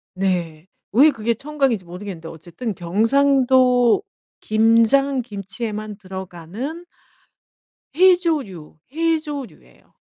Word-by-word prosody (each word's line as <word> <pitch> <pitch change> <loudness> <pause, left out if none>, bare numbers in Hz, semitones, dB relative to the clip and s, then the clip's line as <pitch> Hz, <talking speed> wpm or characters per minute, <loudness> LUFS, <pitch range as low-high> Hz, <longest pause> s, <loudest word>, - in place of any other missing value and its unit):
네. 175 -4 -2 0.3
왜 285 +7 +6
그게 230 -2 -1
청각인지 270 -5 -1
모르겠는데 175 -1 -8
어쨌든 175 +8 -6
경상도 250 +6 +3 0.4
김장 230 +5 +3
김치에만 210 0 -6
들어가는 190 - -7 1.1
해조류, 315 - +1 0.2
해조류예요. 310 -5 -4
225 Hz, 220 characters per minute, -21 LUFS, 190-275 Hz, 1.1 s, 왜